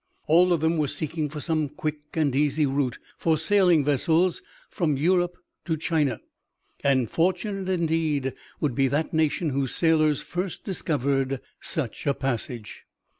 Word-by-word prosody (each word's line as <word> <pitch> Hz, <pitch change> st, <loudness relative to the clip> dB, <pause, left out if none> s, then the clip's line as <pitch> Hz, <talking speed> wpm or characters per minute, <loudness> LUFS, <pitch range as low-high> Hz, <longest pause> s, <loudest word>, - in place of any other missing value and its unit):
All 175 Hz, +4 st, +5 dB
of 170 Hz, -3 st, +2 dB
them 160 Hz, 0 st, +2 dB
were 150 Hz, -, +2 dB
seeking 155 Hz, +1 st, -2 dB
for 150 Hz, +1 st, -6 dB
some 155 Hz, -1 st, -1 dB
quick 155 Hz, 0 st, -4 dB, 0.2 s
and 150 Hz, -5 st, +1 dB
easy 150 Hz, +1 st, +2 dB
route 135 Hz, -3 st, 0 dB, 0.2 s
for 160 Hz, -2 st, +2 dB
sailing 175 Hz, -2 st, +3 dB
vessels 160 Hz, +5 st, +2 dB, 0.3 s
from 155 Hz, -7 st, 0 dB
Europe 175 Hz, +3 st, +2 dB, 0.3 s
to 160 Hz, -2 st, 0 dB
China, 150 Hz, -7 st, 0 dB, 0.6 s
and 130 Hz, -4 st, +3 dB
fortunate 190 Hz, -, -1 dB
indeed 160 Hz, -6 st, 0 dB, 0.3 s
would 145 Hz, -5 st, 0 dB
be 135 Hz, +3 st, +2 dB
that 145 Hz, +6 st, -1 dB
nation 160 Hz, 0 st, +1 dB
whose 135 Hz, -1 st, -1 dB
sailors 155 Hz, -3 st, +3 dB
first 180 Hz, 0 st, -4 dB
discovered 135 Hz, -7 st, -1 dB, 0.2 s
such 145 Hz, -3 st, -3 dB
a 140 Hz, -, +2 dB
passage! 120 Hz, -4 st, -4 dB
155 Hz, 145 wpm, -25 LUFS, 140-170 Hz, 0.6 s, All